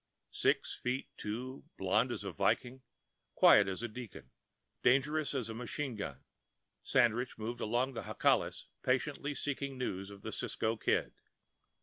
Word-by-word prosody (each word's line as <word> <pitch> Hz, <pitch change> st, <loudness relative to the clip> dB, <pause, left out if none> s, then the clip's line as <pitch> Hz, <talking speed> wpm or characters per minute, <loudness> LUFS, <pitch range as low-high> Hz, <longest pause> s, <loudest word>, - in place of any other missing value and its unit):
Six -, -, +1 dB
feet 125 Hz, +2 st, -2 dB
two, 125 Hz, +5 st, -5 dB
blond -, -, +2 dB
as -, -, -3 dB
a -, -, -3 dB
Viking, 130 Hz, +2 st, 0 dB, 0.5 s
quiet 100 Hz, -, +7 dB
as 95 Hz, +4 st, -3 dB
a -, -, 0 dB
deacon, 110 Hz, -, -9 dB, 0.5 s
dangerous 140 Hz, +3 st, +3 dB
as 125 Hz, -5 st, -1 dB
a 115 Hz, -, -5 dB
machine 125 Hz, +4 st, -3 dB
gun, 105 Hz, -, -5 dB, 0.6 s
Sandridge 125 Hz, -1 st, +2 dB
moved 115 Hz, +2 st, -4 dB
among 120 Hz, +5 st, +1 dB
the 115 Hz, -, -4 dB
Jacales, -, -, +1 dB, 0.2 s
patiently 140 Hz, +3 st, 0 dB
seeking 140 Hz, 0 st, -3 dB
news 95 Hz, -6 st, -3 dB
of 100 Hz, -1 st, -12 dB
the -, -, -4 dB
Cisco 110 Hz, +1 st, -1 dB
Kid. 110 Hz, -, +1 dB
125 Hz, 140 wpm, -34 LUFS, 110-135 Hz, 0.6 s, quiet